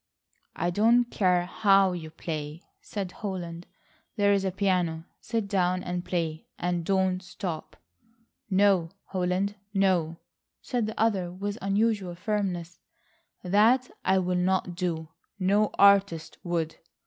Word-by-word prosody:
"I 175 - 0
don't 230 +6 +4
care 180 -6 +1
how 195 0 +4
you 165 -3 -5
play," 155 0 -6 0.2
said 195 -3 -5
Holland. 175 -5 -6 0.5
"There 200 -2 +3
is 200 -1 +1
a 190 - +1
piano. 180 -4 0
Sit 225 -2 -2
down 185 -2 +1
and 180 0 -3
play, 165 -4 -3
and 175 -1 -1
don't 190 0 +1
stop." 180 - -6 0.7
"No, 190 -3 +3 0.2
Holland, 190 +2 -1 0.2
no," 180 -4 +2 0.4
said 240 -4 -2
the 220 - -6
other 195 -6 +1
with 200 +4 -4
unusual 200 -2 0
firmness; 180 -4 -2 0.6
"that 220 +7 +3
I 190 +1 +3
will 180 -1 0
not 185 0 +1
do. 165 -3 -3 0.3
No 205 +2 +2
artist 195 -5 +4
would. 165 -3 -2
185 Hz, 125 wpm, -27 LUFS, 175-200 Hz, 0.7 s, don't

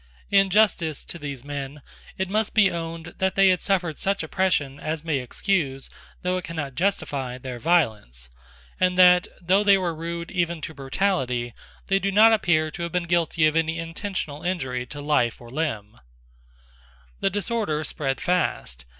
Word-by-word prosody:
In 195 -1 +5
justice 180 -7 +2
to 170 - -8
these 140 -4 -6
men 140 0 -6 0.3
it 190 - -1
must 215 +3 -1
be 200 -4 +5
owned 165 0 -6
that 190 0 +1
they 195 -1 +6
had 180 -1 +2
suffered 180 -6 0
such 195 -3 0
oppression 155 -5 0
as 155 0 -3
may 155 -4 0
excuse, 135 0 -2 0.3
though 180 0 0
it - - -10
cannot 160 -5 -5
justify, 140 -8 -1
their 125 -1 -7
violence; 110 - 0 0.5
and 180 0 +2
that, 180 -1 +7
though 190 +3 +2
they 200 -1 +6
were 180 -3 -1
rude 170 +1 -5
even 170 -2 -1
to 160 - -6
brutality, 135 - -1 0.3
they 195 0 +2
do 195 0 -1
not 220 +3 +7
appear 160 -7 +2
to 170 - -8
have 170 0 -3
been 180 -1 0
guilty 170 -2 +1
of 155 0 +2
any 165 0 +1
intentional 165 -2 -5
injury 130 -9 -2
to 145 +2 -8
life 145 -6 +1
or 120 -1 -13
limb, 120 -8 -3 1.2
The - - +2
disorder 200 -5 -1
spread 135 -3 -2
fast. 65 - -1
165 Hz, 165 wpm, -24 LUFS, 140-185 Hz, 1.2 s, that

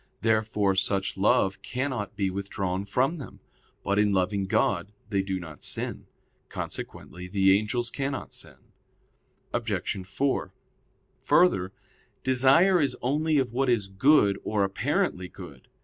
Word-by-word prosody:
Therefore 110 -3 +2
such 95 0 0
love 95 0 +2
cannot 125 -5 -3
be 100 -2 0
withdrawn 95 -1 -3
from 135 - 0
them. 135 - -10 0.4
But 100 +2 +1
in 105 -1 +3
loving 95 +1 0
God 95 +1 +1 0.2
they 100 -1 +2
do 95 -1 -3
not 80 -4 -10
sin. - - -4 0.4
Consequently 90 0 -6
the 95 0 +4
angels 115 +3 -1
cannot 135 -1 -4
sin. - - -9 1.0
Obj. 95 -2 -2
4: 135 +7 -1 0.7
Further, 95 - +3 0.5
desire 135 +8 +5
is 140 - 0
only 150 +4 +1
of 130 -4 0
what 135 +1 +1
is 110 -5 +1
good 100 0 +4
or 105 -2 0
apparently 100 - -1
good. - - -12
105 Hz, 130 wpm, -27 LUFS, 95-130 Hz, 1.0 s, desire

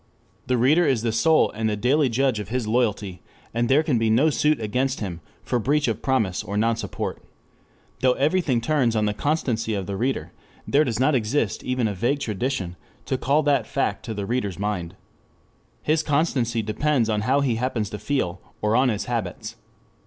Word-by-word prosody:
The 125 0 +2
reader 145 +9 +4
is 120 -5 +1
the 115 - +1
sole 155 +8 +3
and 110 0 -1
the 105 - 0
daily 135 +5 +2
judge 125 -1 +1
of 105 - -6
his 125 0 -1
loyalty, 105 -5 0 0.3
and 120 +1 0
there 145 +4 +4
can 135 -7 +1
be 115 -1 +1
no 135 +8 +4
suit 150 0 +2
against 125 +5 -1
him 90 -5 -5 0.2
for 125 - 0
breach 145 +5 +1
of - - -2
promise 110 -9 0
or 100 +2 -4
nonsupport. 115 +1 -1 0.8
Though 130 -1 +4
everything 145 -3 +1
turns 125 -3 +1
on 105 -1 +2
the 105 - 0
constancy 115 -4 -1
of 100 -2 -3
the 100 - -4
reader, 130 +6 -2 0.4
there 145 +2 +4
does 120 -6 -2
not 135 +4 +3
exist 125 +3 0
even 125 -2 0
a 105 - -2
vague 120 +9 0
tradition 105 -6 -3 0.3
to - - -1
call 140 +5 +2
that 145 -1 +2
fact 140 - -1
to 110 -3 -4
the 100 -1 -3
reader's 105 -6 -2
mind. 95 -4 -3 0.9
His 155 +1 +2
constancy 140 -7 0
depends 120 +3 +1
on 105 -2 0
how 130 +6 +2
he 125 -5 +1
happens 115 -4 -2
to 105 - -5
feel, 95 -11 -2 0.2
or 105 +1 +1
on 130 +1 +4
his 105 -3 -2
habits. 120 -3 -4
120 Hz, 190 wpm, -24 LUFS, 105-135 Hz, 0.9 s, reader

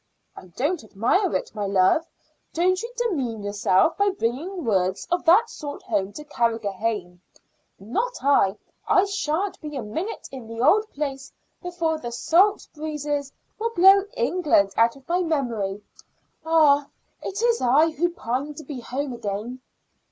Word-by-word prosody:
"I - - -12
don't 285 - -2
admire 240 - +1
it, - - -3
my 205 -2 -3
love. 195 - +3 0.5
Don't 370 +3 +2
you 465 +1 -6
demean 270 - -2
yourself 205 - +2
by 405 0 +3
bringing 345 +2 -3
words 190 -4 0
of 350 0 0
that 385 +8 +6
sort 290 -8 -8
home 200 -3 -1
to 300 - -8
Carrigrohane." 215 -7 -2 0.6
"Not 425 - -2
I. 215 -8 +3 0.3
I 375 - +4
shan't 390 -1 -2
be 300 -1 -7
a 260 - -3
minute 325 - -5
in 255 -4 -9
the 230 0 -8
old 410 - +4
place 275 -2 -5 0.3
before 335 -3 -2
the 240 -5 -6
salt 370 - +2
breezes 295 -2 -3 0.3
will 460 +1 0
blow 385 +2 +7
England 325 - +2
out 230 +1 +3
of 270 -1 -18
my 355 +2 +1
memory. 230 - -2 0.6
Ah! 300 -3 +4 0.3
it's 460 +4 0
I 295 +7 +4
who 340 +3 0
pine 280 -1 -4
to 310 - -9
be 285 -5 -7
home 260 +3 -4
again." 230 +2 -5
285 Hz, 150 wpm, -24 LUFS, 230-350 Hz, 0.6 s, blow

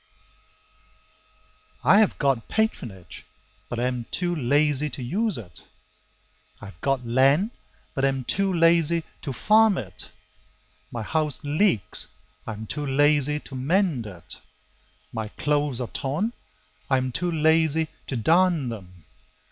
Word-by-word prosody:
811] - - +2
I - - +7
have 215 - +3
got 135 -5 +1
patronage, 100 - -3 0.4
but 120 - -4
am 125 0 -1
too 175 -1 0
lazy 150 +1 +2
to 130 - -7
use 210 - 0
it; 95 -6 -10 1.0
I - - -10
have 95 -4 -13
got 135 -3 0
land, 135 - +3 0.4
but 135 - -2
am 135 -1 +1
too 195 +9 +1
lazy 165 -1 +3 0.2
to 140 - -4
farm 215 - +4
it. 95 -6 -5 0.8
My 115 -2 -4
house 150 +2 -1
leaks; 145 - +1 0.4
I 110 - -3
am 110 +1 -7
too 145 +5 -4
lazy 145 +1 +3
to - - -13
mend 140 - +1
it. 90 0 -9 0.7
My 110 -2 -3
clothes 145 +2 0
are 125 - -2
torn; 160 - -2 0.6
I 135 - +4
am 130 0 -1
too 175 +7 -1
lazy 160 0 +3 0.2
to 135 - -3
darn 165 - +3
them. 90 -7 -10
140 Hz, 135 wpm, -25 LUFS, 120-165 Hz, 1.0 s, I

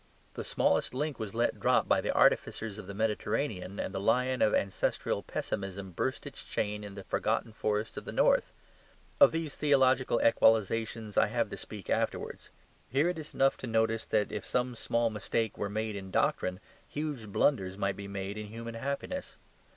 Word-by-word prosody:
The - - -5
smallest - - +1
link 145 0 -2
was 110 -1 -5
let 120 +1 +1
drop - - +3
by - - +3
the - - 0
artificers 110 -2 +2
of 95 - -9
the 100 - -7
Mediterranean, 105 -2 -1
and - - -3
the - - -2
lion 125 +5 +2
of 105 - +5
ancestral 100 -1 0
pessimism 95 -1 -4
burst 130 +9 -2
his 140 -1 -8
chain 105 0 -2
in 100 -1 -8
the 100 - -7
forgotten 110 - -1
forests 105 0 -1
of - - -5
the - - -5
north. - - +3 0.7
Of 285 - +8
these 165 -3 -3
theological 130 -4 +3
equalisations 110 -1 +2
I - - +6
have 115 -1 -1
to - - -3
speak 105 -5 -8
afterwards. - - -2 0.4
Here 140 +7 +3
it 180 -2 -3
is 155 - -9
enough 135 0 +3
to - - -6
notice 115 0 +1
that 105 - +1
if 105 -2 -4
some 125 0 0
small 115 0 0
mistake 110 +1 -1
were 100 - -3
made 110 +1 -2
in 95 -1 -6
doctrine, 90 0 +1 0.3
huge 145 -7 -4
blunders 95 -3 +1
might 100 -1 0
be 100 0 -7
made 100 +1 -4
in 105 - -6
human 115 +2 -7
happiness. 140 - -4
110 Hz, 180 wpm, -31 LUFS, 100-130 Hz, 0.7 s, Of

